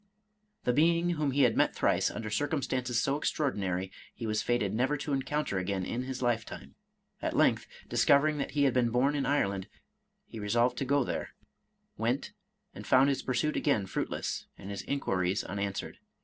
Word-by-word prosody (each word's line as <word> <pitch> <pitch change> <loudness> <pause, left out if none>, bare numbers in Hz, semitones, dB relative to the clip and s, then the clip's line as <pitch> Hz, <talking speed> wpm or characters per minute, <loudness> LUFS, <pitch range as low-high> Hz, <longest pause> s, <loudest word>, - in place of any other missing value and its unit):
The 125 - +2
being 170 +4 +3
whom 150 -4 0
he 140 +1 +3
had 120 -3 +4
met - - +2
thrice, - - +2
under 110 -1 -5
circumstances 130 -2 0
so 135 +4 0
extraor 150 -2 0
dinary, 95 -1 -2 0.2
he 115 - -6
was 110 -1 0
fated 115 -5 0
never 130 +6 +1
to 145 0 -3
encounter 135 -6 -1
again 95 0 -2
in 125 +2 -3
his 130 -1 -4
lifetime. 115 - -2 0.5
At - - -2
length, - - +3 0.2
discovering 150 +1 +3
that - - -2
he 145 - +2
had 135 -3 +3
been 125 -2 +2
bom 125 +5 +2
in 145 -2 -1
Ireland, 100 -9 0 0.6
he 115 - -9
resolved 120 +4 +1
to 135 - -1
go 140 +1 +2
there, - - -4 0.3
— - - -36
^went, - - -1 0.4
and - - -9
found 130 +2 +5
his 140 - 0
pursuit 130 +4 0
again 125 -9 +1
fruitless, - - -3
and 100 - -8
his 100 - -4
inquiries 95 -9 0
unanswered. 100 0 -4
125 Hz, 180 wpm, -30 LUFS, 105-140 Hz, 0.6 s, found